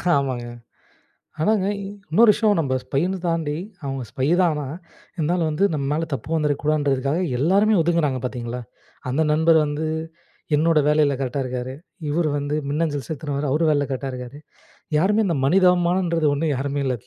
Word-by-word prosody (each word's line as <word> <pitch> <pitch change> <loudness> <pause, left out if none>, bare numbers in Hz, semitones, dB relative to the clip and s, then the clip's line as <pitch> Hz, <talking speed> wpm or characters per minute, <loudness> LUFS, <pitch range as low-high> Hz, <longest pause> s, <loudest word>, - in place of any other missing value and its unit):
ஆமாங்க. 130 -4 -1 0.9
ஆனாங்க 200 +3 +2 0.4
இன்னொரு 220 +7 +6
விஷயம் 210 -2 +2
நம்ம 135 -4 -1
ஸ்பைன்னு 180 +7 -1
தாண்டி 165 -3 -1 0.3
அவங்க 135 -1 -3
ஸ்பை 130 +2 -2
தான் 175 -3 +3
ஆனா 150 -1 -3 0.5
இருந்தாலும் 165 0 0
வந்து 155 +6 +1
நம்ம 145 -3 -2
மேல 160 +2 -1
தப்பு 135 +2 -4
வந்துருக்கக்கூடாதுன்றதுக்காக, 145 -1 0 0.2
எல்லாருமே 200 - +3
ஒதுங்குறாங்க 160 -5 +1
பார்த்தீங்களா. 125 -1 -4 0.5
அந்த 145 +5 +1
நண்பர் 160 +1 +4
வந்து 145 +2 -2 0.7
என்னோட 160 +1 +3
வேலையில 150 -2 +3
கரெக்ட்டா 135 +1 -2
இருக்காரு. 125 0 -4 0.4
இவர் 160 +1 +1
வந்து 145 +1 -2 0.2
மின்னஞ்சல் 145 -4 -1
செலுத்தினவரு 145 -2 -3
அவரு 155 +4 +2
வேலையில 145 -1 +2
கரெக்டா 135 0 -3
இருக்காரு. 125 +2 -8 0.6
யாருமே 205 +7 +3
இந்த 170 - 0
மனிதாபிமானம்ன்றது 175 -1 +3
ஒன்னு 150 +3 -1
யாருமே 140 +2 -2
இல்ல. 130 - +1
150 Hz, 145 wpm, -22 LUFS, 140-170 Hz, 0.9 s, இன்னொரு